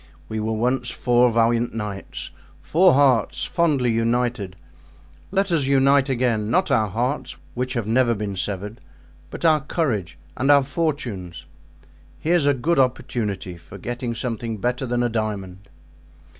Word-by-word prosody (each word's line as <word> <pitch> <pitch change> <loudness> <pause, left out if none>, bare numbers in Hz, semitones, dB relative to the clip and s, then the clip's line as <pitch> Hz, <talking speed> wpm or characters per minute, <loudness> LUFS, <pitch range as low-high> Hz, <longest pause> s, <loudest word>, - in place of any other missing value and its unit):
We 110 - -3
were 110 +1 -1
once 125 +2 0
four 120 0 +3
valiant 115 +1 +1
knights—four 110 - -1
hearts 130 -5 +3
fondly 145 -8 +1
united; 115 -4 0 0.7
let 195 0 0
us 155 -5 +2
unite 135 0 +4
again, 120 -5 0
not 185 +11 +2
our 110 -1 +3
hearts, 125 +5 -2 0.2
which 125 +1 -2
have 120 -3 -1
never 120 +1 +2
been 100 -1 -4
severed, 105 +3 -4 0.5
but - - -6
our 155 -2 +5
courage 110 - -2 0.2
and 135 +2 0
our 140 -1 +7
fortunes. 120 - -3 0.7
Here's 165 - +2
a 145 - +4
good 150 +5 +1
opportunity 105 -8 -1
for 90 +3 -12
getting 120 +3 -4
something 115 -2 -3
better 125 +5 -1
than 120 0 0
a - - +2
diamond." 100 -4 -4
120 Hz, 140 wpm, -23 LUFS, 110-135 Hz, 0.7 s, our